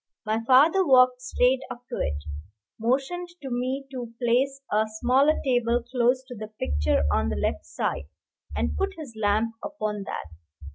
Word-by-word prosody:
My 215 +1 0
father 310 +9 +6
walked 255 -4 +5
straight 250 +1 +2
up 245 +1 -9
to - - -4
it, 70 0 -1 0.6
motioned 270 +10 0 0.2
to 265 - -5
me 255 +3 -2
to 245 -3 -6
place 260 +3 +1
a 215 +1 +3
smaller 270 +5 +3
table 245 -2 +2
close 250 +1 +2
to 255 - -10
the 215 0 -6
picture 75 - 0
on 75 0 +1
the 75 - -2
left 70 - -2
side, 70 - -3 0.5
and 75 0 -1
put 75 - -1
his 280 -8 -9
lamp 220 +1 +1
upon 215 -9 -3
that. - - -4
245 Hz, 160 wpm, -26 LUFS, 215-265 Hz, 0.6 s, father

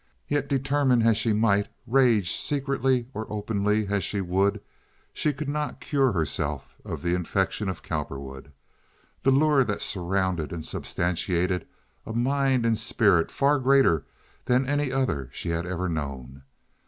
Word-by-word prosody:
Yet, 145 -1 0
determine 135 -3 +2
as 115 -1 +4
she 115 +1 +1
might, 105 -1 +2 0.2
rage 120 -7 +3
secretly 135 -3 0
or 110 0 -6
openly 105 0 0
as 100 -1 -1
she 100 - -2
would, 95 +3 +1 0.5
she 150 - 0
could 145 +1 -6
not 150 -1 -3
cure 135 0 +1
herself 75 -5 -3
of - - -6
the 85 0 +1
infection 95 +3 -1
of 95 - -5
Cowperwood, 70 +1 -5 0.7
the - - +2
lure 140 0 +4
that 105 -4 -2
surrounded 95 -4 -1
and 80 -2 -5
substantiated 90 0 -1 0.4
a 110 - -6
mind 130 +1 +1
and 115 -2 +2
spirit 105 -6 +3
far 140 +1 +2
greater 130 - +4 0.4
than 125 +2 +2
any 145 0 0
other 125 - -1
she 85 - -5
had 85 +1 -2
ever 90 0 -2
known. 70 -5 -5
105 Hz, 145 wpm, -26 LUFS, 90-135 Hz, 0.7 s, as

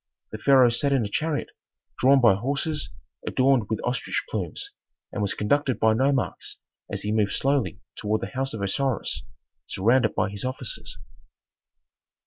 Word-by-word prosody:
The 110 - -6
pharaoh 130 -1 +6
sat 140 +4 +1
in 130 -5 +2
a - - -4
chariot 155 +6 -1 0.5
drawn 135 +2 +6
by 115 -5 +7
horses 140 +7 -2 0.4
adorned 130 -5 +3
with 110 - -1
ostrich 125 0 -1
plumes, - - -4 0.4
and 105 - -3
was 100 - 0
conducted 130 +2 +1
by 110 0 +4
nomarchs 130 +2 0 0.3
as - - -3
he 105 - -1
moved 105 -2 +1
slowly 135 -6 +1 0.2
toward 110 +1 -1
the - - -4
house 135 -1 -1
of 100 - -4
Osiris, 130 +4 -1 0.5
surrounded 120 +7 +2
by 105 0 +1
his 100 -1 -6
officers. 130 -1 -4
125 Hz, 150 wpm, -25 LUFS, 105-135 Hz, 0.5 s, by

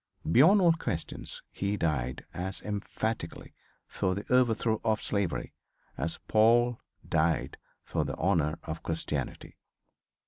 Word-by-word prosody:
Beyond 165 - +7
all 170 -2 +6
question 85 - -4 0.3
he 100 +1 -2
died 70 -8 -1
as 90 +3 -3
emphatically 105 -2 -4 0.3
for 95 0 -1
the 100 - -5
overthrow 115 -3 +3
of 110 -1 +1
slavery 100 -4 -1 0.4
as 80 +5 -1
Paul 120 +2 +4 0.3
died 80 0 +1 0.3
for - - -1
the - - -4
honor 80 -5 +1
of 80 0 -5
Christianity. 75 -4 -3
100 Hz, 115 wpm, -29 LUFS, 80-115 Hz, 0.4 s, Beyond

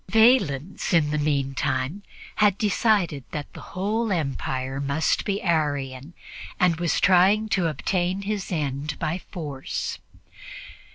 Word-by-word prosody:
Valens, 195 - +3
in 150 -3 +3
the 150 - 0
meantime, 140 +2 -1 0.4
had 205 -2 +4
decided 200 - +1
that 150 -1 -6
the - - -10 0.2
whole 215 +4 0
empire 135 -4 -2
must 140 +3 +1
be 200 0 -1
Arian 145 -3 -1 0.4
and 175 -3 +3
was 170 -2 +1
trying 190 +4 +4
to 185 -4 +2
obtain 180 +5 -1
his 200 -2 -3
end 145 -2 -2
by 165 +2 -2
force. 145 -8 -5
165 Hz, 120 wpm, -25 LUFS, 140-195 Hz, 0.4 s, had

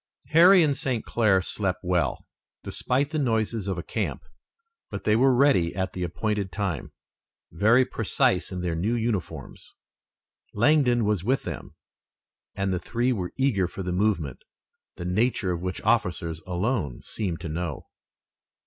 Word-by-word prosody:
Harry 175 +3 +7
and 145 -3 +2
St. 125 -4 -2
Clair 105 -5 +2
slept 95 -2 -2
well, 90 -7 0 0.4
despite 140 +4 -1
the 155 - -1
noises 110 -5 0
of 95 -2 -2
a 85 - -4
camp, - - -3 0.7
but - - -6
they 105 - +3
were 130 +4 +5
ready 120 -11 +3
at 95 0 -2
the 90 - -5
appointed 100 +2 -2
time, 90 - -3 0.6
very 110 +9 +4
precise - - 0
in 90 - -4
their 90 -2 -1
new 105 +9 0
uniforms. 100 - -4 0.8
Langdon 120 -1 +3
was 105 -4 0
with 130 +6 +1
them - - -7 0.8
and 95 -1 -1
the 90 - -1
three 120 +6 0
were 90 -6 -4
eager 125 -9 +2
for 95 - -7
the 90 - -3
movement, 90 - 0 0.5
the 85 - -7
nature 100 +1 +1
of 85 -1 -3
which 90 0 -3
officers 80 -1 0
alone 90 - -2
seemed 90 -7 -3
to 85 - -5
know. 80 -2 -4
100 Hz, 150 wpm, -26 LUFS, 90-120 Hz, 0.8 s, Harry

